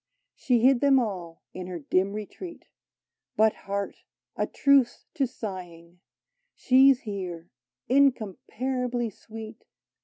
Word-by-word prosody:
She 250 -6 +1
hid 255 0 +5
them 280 -1 +5
all 185 -9 -3
in 185 -1 -6
her 180 -1 -5
dim 185 +5 0
retreat: 215 - -8 0.7
But, 220 0 +5
heart! 200 0 -4 0.4
a - - -1
truce 280 -4 +3
to 275 -5 +1
sighing; 180 -7 -8 0.6
She 265 +2 +6
's 260 - 0
here 180 -6 -6 0.2
— - - -66
incomparably 250 -1 0
sweet. 220 +2 -10
220 Hz, 120 wpm, -27 LUFS, 185-260 Hz, 0.7 s, She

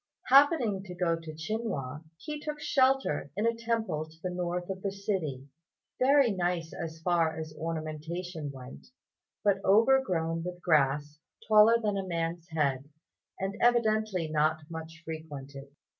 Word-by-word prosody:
Happening 270 - +5
to 180 -2 -8
go 175 -2 +1
to 165 -1 -8
Chinhua, 160 - -4
he 300 - -6
took 300 0 -5
shelter 265 - +2
in 210 - +1
a 230 - +3
temple 225 -9 -2
to 160 - -18
the 185 - -2
north 180 0 -2
of 190 0 -6
the 200 - -2
city; 185 -10 -3 0.5
very 270 -1 +5
nice 175 -3 -1
as 160 -1 -6
far 165 -3 +2
as 155 -1 -6
ornamentation 160 +1 -4
went, 130 -1 -11 0.6
but 195 -1 +2
overgrown 195 -7 +3
with 180 0 -6
grass 150 -3 +1 0.3
taller 220 +2 +7
than 210 -3 -1
a 190 - -4
man's 170 0 -3
head, 140 -4 -1 0.5
and 195 +1 -2
evidently 215 -7 +2
not 155 +1 +1
much 160 0 -8
frequented. 145 -4 -7
175 Hz, 145 wpm, -30 LUFS, 155-215 Hz, 0.6 s, taller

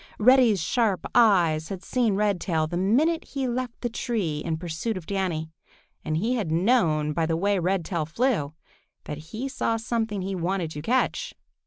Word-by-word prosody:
Reddy's 240 -3 +5
sharp 200 +3 0
eyes 175 -10 +4
had 195 -2 -6
seen 235 -5 +1
Redtail 190 -6 +1
the 160 - -5
minute 265 - +2
he 270 -2 -3
left 245 0 -3
the 240 - 0
tree 205 -10 -2
in 160 +1 -2
pursuit 175 +6 -3
of 175 - -8
Danny, 170 -5 -2 0.5
and 155 - -1
he 225 +9 0
had 210 -10 -2
known 165 -5 +2
by 160 +1 0
the 165 0 0
way 200 +2 +1
Redtail 175 -3 -1
flew 165 - 0 0.5
that 150 - -6
he 235 +8 -4
saw 245 -4 -1
something 220 -3 -2
he 195 +1 -3
wanted 180 -2 -2
to 150 - -6
catch. 250 +11 0
195 Hz, 170 wpm, -25 LUFS, 160-230 Hz, 0.5 s, Reddy's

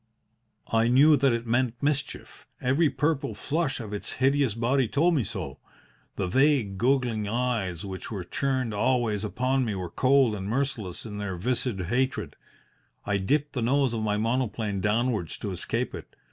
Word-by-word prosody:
"I 115 0 +3
knew 140 +5 +6
that 135 -1 +3
it 115 0 -1
meant 120 +1 +1
mischief. 145 +1 -3
Every 140 +5 +2
purple 140 -3 -1
flush 150 +7 -1
of 110 -3 -6
its 105 - -5
hideous 135 -3 +2
body 125 +2 +1
told 165 +9 +2
me 140 -7 +2
so. - - -5 0.6
The 95 - -1
vague, 130 -4 +2
goggling 120 -4 +1
eyes 110 -7 -1
which 95 -1 -6
were 100 -5 -4
turned 130 +4 -1
always 110 -1 +1
upon 130 +5 0
me 110 -4 -2
were 90 -3 -5
cold 130 -3 +3
and 100 -2 -4
merciless 120 -7 -2
in 105 -2 -6
their 100 -3 -3
viscid 120 0 -1
hatred. 125 +9 -1 0.7
I 100 -1 +1
dipped 145 +10 0
the 125 - -2
nose 130 +1 +2
of 115 - -2
my 105 -1 0
monoplane 110 -3 -1
downwards 105 -3 0
to - - -4
escape - - -2
it. - - -9
120 Hz, 165 wpm, -27 LUFS, 105-135 Hz, 0.7 s, knew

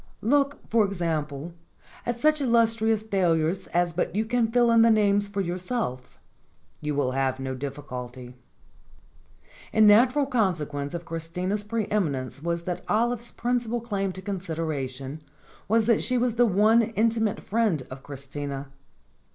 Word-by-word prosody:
Look, 280 +4 +1
for 225 -1 +3
example,, 165 -5 -2 0.5
at 240 0 -1
such 305 +2 +3
illustrious 225 -3 +2
failures 180 -3 +1
as 175 0 0
But 180 - -2
you 215 +2 +1
may 240 -2 +3
fill 240 0 +3
in 230 0 +6
the 230 - +6
names 205 -2 +3
for 200 0 -2
yourself; 180 - -3 0.6
you 150 -1 -3
will 135 -3 +1
have 130 0 0
no 130 0 -3
difficulty. 130 -2 -7 1.4
The 220 - +2
natural 245 +7 +6
consequence 160 - -1
of 170 0 -6
Christina's 175 +5 -3
pre 215 +1 -2
eminence 140 -10 -1
was 170 +1 -2
that 175 0 -4
Olive's 235 +2 0
principal 240 -1 -1
claim 200 -4 -2
to 185 - -9
consideration 155 -7 -4 0.5
was 225 +1 +3
that 230 -1 +3
she 255 - 0
was 245 -1 +1
the 240 +1 +4
one 215 +4 +4
intimate 225 -1 0
friend 205 - 0
of 130 0 -8
Christina. 140 0 -6
195 Hz, 145 wpm, -26 LUFS, 150-230 Hz, 1.4 s, in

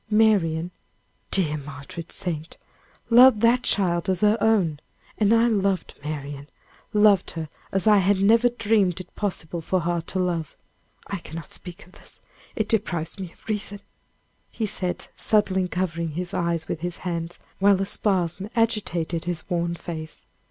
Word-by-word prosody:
Marian 185 -6 +3 0.6
dear 155 -6 +3
martyred 145 +3 -9
saint! 165 -4 -3 0.5
loved 245 -2 +8
that 235 +2 +4
child 175 -6 +1
as 185 -2 0
her 210 0 +5
own. 185 -10 +2 0.4
And 210 -1 +3
I 230 0 +5
loved 200 -5 0
Marian 145 -1 -6 0.4
loved 210 -3 +4
her 160 -1 -3 0.2
as 195 +1 0
I 210 -1 +6
had 195 +1 +2
never 225 +5 +5
dreamed 210 -6 +1
it 185 - -10
possible 175 -5 -3
for 185 +3 0
heart 170 -1 -2
to - - -4
love 175 -4 -2 0.5
I 200 -2 -4
cannot 165 -1 -8
speak 180 +3 -9
of 180 - -20
this! - - -14 0.4
it 220 - -1
deprives 185 -7 -1
me 185 -3 -6
of - - -23
reason," 205 -1 -3 0.7
he 225 - -3
said, 185 -3 -3
suddenly 190 -4 +2
covering 170 -3 -2
his 175 +2 -4
eyes 170 -2 -1
with - - -3
his 175 +1 -4
hands, 170 -1 -3 0.2
while 200 0 +5
a 195 - 0
spasm 190 -1 -1
agitated 180 -8 0
his 175 -3 -4
worn 170 0 0
face. 160 -2 -8
180 Hz, 155 wpm, -24 LUFS, 165-210 Hz, 0.7 s, loved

